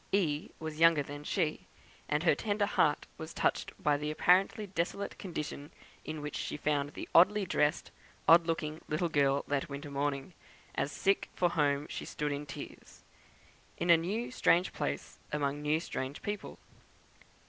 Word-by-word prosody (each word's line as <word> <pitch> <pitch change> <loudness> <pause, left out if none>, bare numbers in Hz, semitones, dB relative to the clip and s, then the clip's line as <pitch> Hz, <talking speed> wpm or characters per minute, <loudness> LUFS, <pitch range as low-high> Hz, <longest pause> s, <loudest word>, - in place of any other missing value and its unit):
"E." 160 -6 +1
was 155 -1 -6
younger 165 -3 +6
than 145 +1 -8
she, 155 -1 -1 0.4
and 150 +2 +1
her 170 - +5
tender 205 +6 0
heart 150 -7 +2
was 160 +1 -7
touched - - 0
by 145 -1 +2
the 150 +1 -3
apparently 185 +6 +3
desolate 190 +1 -3
condition 150 -5 -5 0.3
in 155 -1 -5
which 150 - -5
she - - -3
found 145 -1 0
the - - -6
oddly 200 +4 +6
dressed, 150 -4 +1 0.4
odd 165 +1 +7
looking 155 -1 -2
little 160 +3 0
girl 140 -3 +2
that 145 +2 -1
winter 140 +1 -6
morning, 140 +3 -2 0.4
as 140 - -1
"sick 195 +5 +1
for 175 -1 +2
home 145 -3 +1
she - - -5
stood 150 -1 -3
in 145 +1 -4
tears," - - -10 0.7
in 175 - +3
a - - +10
new 205 +10 -2
strange 180 -7 +3
place, - - -4
among 145 -1 -1
new 150 +1 +2
strange 135 -4 -5
people. 205 0 -4
155 Hz, 160 wpm, -32 LUFS, 145-175 Hz, 0.7 s, a